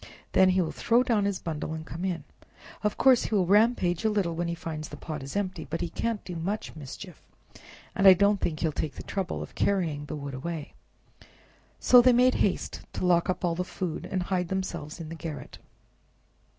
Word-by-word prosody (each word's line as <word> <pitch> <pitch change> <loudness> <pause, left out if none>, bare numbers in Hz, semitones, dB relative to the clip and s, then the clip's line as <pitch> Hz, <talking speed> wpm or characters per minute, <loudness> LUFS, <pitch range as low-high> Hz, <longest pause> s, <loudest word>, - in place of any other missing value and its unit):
Then 190 0 +5
he 185 0 +3
will 165 - -1
throw 235 +2 +2
down 220 -5 +1
his 200 -2 0
bundle 160 -2 -4
and 160 0 -7
come 165 +2 -6
in. 175 -5 -2 0.6
Of 210 - 0
course 260 -2 +5
he 220 - -1
will 190 -3 +3
rampage 205 -2 +3
a 220 - +3
little 200 -5 0
when 170 +1 -1
he 170 - -2
finds 155 -2 -6
the - - -9
pot 155 -3 -6
is 135 +5 -7
empty, 185 -5 -2
but 165 - -2
he 175 - -2
can't 230 +1 -2
do 180 - -6
much 190 +5 -3
mischief, 160 +5 -9 0.7
and 195 -4 +4
I 190 - +12
don't 200 +1 +3
think 155 -3 -2
he - - +1
will 160 - +1
take 150 0 -3
the - - -8
trouble 190 -3 -3
of - - -11
carrying 165 -7 0
the 155 - -5
wood 140 -2 -6
away." 155 +3 -5 1.1
So 250 -1 +7
they 250 0 +5
made 250 +1 +5
haste 195 - 0
to - - -2
lock 175 0 +3
up 180 0 0
all 170 - +1
the 180 +2 -1
food 180 -2 -4
and 185 -2 -1
hide 180 -1 -1
themselves 175 -4 -4
in 160 -2 -7
the - - -6
garret. 160 -2 -7
180 Hz, 215 wpm, -28 LUFS, 160-200 Hz, 1.1 s, I